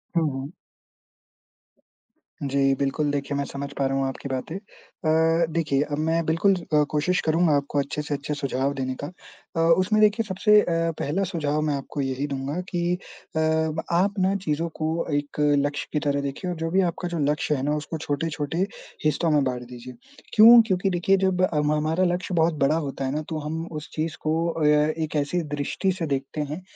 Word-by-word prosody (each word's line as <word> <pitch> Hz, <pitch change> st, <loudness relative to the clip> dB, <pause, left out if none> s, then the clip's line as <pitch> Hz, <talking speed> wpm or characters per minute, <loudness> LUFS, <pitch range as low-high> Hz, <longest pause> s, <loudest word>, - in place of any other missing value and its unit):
हुँ, 165 Hz, -3 st, +2 dB
हुँ। 135 Hz, +2 st, -5 dB, 1.9 s
जी, 135 Hz, 0 st, +2 dB
बिल्कुल, 145 Hz, +1 st, 0 dB
देखिए 140 Hz, 0 st, -2 dB
मैं 140 Hz, -, 0 dB
समझ 140 Hz, 0 st, -6 dB
पा 140 Hz, -, +1 dB
रहा 135 Hz, 0 st, -1 dB
हूँ 135 Hz, -, +1 dB
आपकी 135 Hz, +1 st, -6 dB
बातें। 130 Hz, +5 st, -4 dB
अ, 165 Hz, -4 st, 0 dB
देखिए 150 Hz, -5 st, +1 dB
अब 145 Hz, -, -1 dB
मैं 165 Hz, +2 st, +1 dB
बिल्कुल 165 Hz, +5 st, +3 dB, 0.2 s
अ, 150 Hz, -, +5 dB
कोशिश 165 Hz, +5 st, +1 dB
करूँगा 160 Hz, 0 st, +3 dB
आपको 145 Hz, 0 st, 0 dB
अच्छे 140 Hz, +2 st, -2 dB
से 150 Hz, 0 st, -4 dB
अच्छे 145 Hz, +1 st, -3 dB
सुझाव 140 Hz, -1 st, -1 dB
देने 130 Hz, -1 st, -3 dB
का -, -, -2 dB, 0.5 s
अ, -, -, 0 dB, 0.2 s
उसमें 205 Hz, +3 st, +2 dB
देखिए 215 Hz, +2 st, +4 dB
सबसे 210 Hz, +2 st, +4 dB
अ, -, -, -3 dB, 0.3 s
पहला 170 Hz, +8 st, 0 dB
सुझाव 155 Hz, -5 st, -1 dB
मैं 145 Hz, -, +1 dB
आपको 140 Hz, +1 st, -4 dB
यही 135 Hz, +1 st, -2 dB
दूँगा 140 Hz, +3 st, -3 dB
कि 175 Hz, -, -2 dB, 0.5 s
अ, -, -, +1 dB, 0.5 s
आप 185 Hz, +4 st, +2 dB
ना 190 Hz, +1 st, +2 dB
चीज़ों 155 Hz, +2 st, 0 dB
को 155 Hz, -, 0 dB, 0.3 s
एक 145 Hz, +1 st, -2 dB, 0.3 s
लक्ष्य 145 Hz, 0 st, -3 dB
की 150 Hz, -, +2 dB
तरह 140 Hz, 0 st, +1 dB
देखिए 140 Hz, +6 st, -4 dB
और 175 Hz, -, -5 dB
जो 165 Hz, +1 st, -2 dB
भी 190 Hz, +2 st, +4 dB
आपका 175 Hz, +2 st, -5 dB
जो 175 Hz, -1 st, -3 dB
लक्ष्य 150 Hz, 0 st, 0 dB
है 130 Hz, -, -3 dB
ना, 150 Hz, +2 st, +1 dB
उसको 150 Hz, +2 st, -4 dB
छोटे-छोटे 155 Hz, +3 st, -2 dB, 0.4 s
हिस्सों 160 Hz, +2 st, +2 dB
में 150 Hz, -2 st, +3 dB
बाँट 125 Hz, -2 st, -2 dB
दीजिए। 125 Hz, 0 st, -9 dB, 0.4 s
क्यों? 230 Hz, +2 st, +9 dB
क्योंकि 190 Hz, -1 st, +1 dB
देखिए 185 Hz, +2 st, +2 dB
जब 190 Hz, -1 st, +1 dB
अम, 150 Hz, -5 st, +2 dB
हमारा 155 Hz, +4 st, +1 dB
लक्ष्य 180 Hz, +1 st, -3 dB
बहुत 165 Hz, 0 st, +3 dB
बड़ा 140 Hz, +3 st, +3 dB
होता 135 Hz, 0 st, -4 dB
है 130 Hz, -, -1 dB
ना 155 Hz, -, -1 dB
तो 160 Hz, -2 st, -3 dB
हम 160 Hz, +2 st, -4 dB
उस 150 Hz, -1 st, -7 dB
चीज़ 155 Hz, 0 st, -3 dB
को 160 Hz, +2 st, 0 dB
अ, 165 Hz, -2 st, -1 dB, 0.3 s
एक 155 Hz, -1 st, -3 dB
ऐसी 150 Hz, +4 st, 0 dB
दृष्टि 145 Hz, +6 st, -1 dB
से 165 Hz, -, -1 dB
देखते 135 Hz, +3 st, -5 dB
हैं, 160 Hz, +5 st, -5 dB
155 Hz, 195 wpm, -25 LUFS, 140-170 Hz, 1.9 s, क्यों